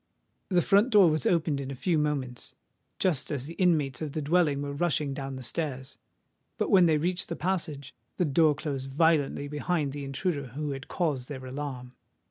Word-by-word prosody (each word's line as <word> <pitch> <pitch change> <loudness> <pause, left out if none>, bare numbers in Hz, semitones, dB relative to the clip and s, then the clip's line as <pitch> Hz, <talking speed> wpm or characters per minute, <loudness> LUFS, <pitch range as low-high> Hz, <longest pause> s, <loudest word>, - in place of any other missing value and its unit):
The 180 -3 +3
front 205 +5 +4
door 200 -8 +6
was 155 - 0
opened 160 -4 +1
in 135 -1 -5
a 140 - -5
few 165 +4 +1
moments, 140 -5 -2 0.4
just 155 -8 +1
as 140 -4 -3
the 165 - -7
inmates 155 -8 +1
of 150 -3 -4
the 155 - -2
dwelling 150 -2 +2
were 140 0 -4
rushing 150 -2 0
down 135 -1 -5
the 130 - -6
stairs. 135 -1 -3 0.6
But - - -1
when 185 -4 +7
they 155 -2 +3
reached 175 +4 -1
the 170 - -2
passage, 155 -7 -3 0.2
the 180 - +2
door 150 +1 +3
closed 135 -3 -4
violently 145 -1 +2
behind 150 0 -1
the 145 +1 -6
intruder 140 +1 -2
who 150 0 -2
had 135 -1 -6
caused 145 -8 -2
their 130 -3 -6
alarm. 130 -2 -6
150 Hz, 190 wpm, -28 LUFS, 135-170 Hz, 0.6 s, when